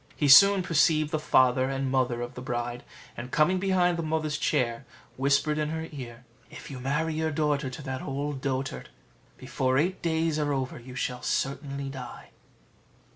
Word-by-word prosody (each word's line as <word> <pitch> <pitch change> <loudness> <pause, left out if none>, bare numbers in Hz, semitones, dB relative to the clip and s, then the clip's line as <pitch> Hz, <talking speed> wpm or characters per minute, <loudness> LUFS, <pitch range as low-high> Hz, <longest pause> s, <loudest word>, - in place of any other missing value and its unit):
He 145 - 0
soon 195 +7 +8
perceived 155 -2 +2
the 155 - 0
father 130 -2 +3
and 135 -1 -2
mother 125 -2 0
of 120 - -7
the 125 - -8
bride; 120 -1 -4 0.3
and 120 +1 -7
coming 175 +7 +2
behind 180 -2 +2
the - - -1
mother's 155 -2 -2
chair, 125 -4 0 0.3
whispered 140 +3 +1
in 150 0 -1
her 160 +1 -4
ear, 125 -4 -9 0.2
"If 150 - -11
you 130 - -7
marry 150 +5 -1
your 160 +1 -1
daughter 150 -3 0
to 130 +3 -9
that 130 -1 -4
old 140 0 -4
dotard, 135 -1 -3 0.5
before 130 0 -1
eight 180 +6 0
days 160 -1 0
are 145 -1 0
over 130 -2 -3
you 125 +1 -11
shall 125 0 -3
certainly 140 0 -2
die." 130 -3 -9
140 Hz, 175 wpm, -27 LUFS, 130-155 Hz, 0.5 s, soon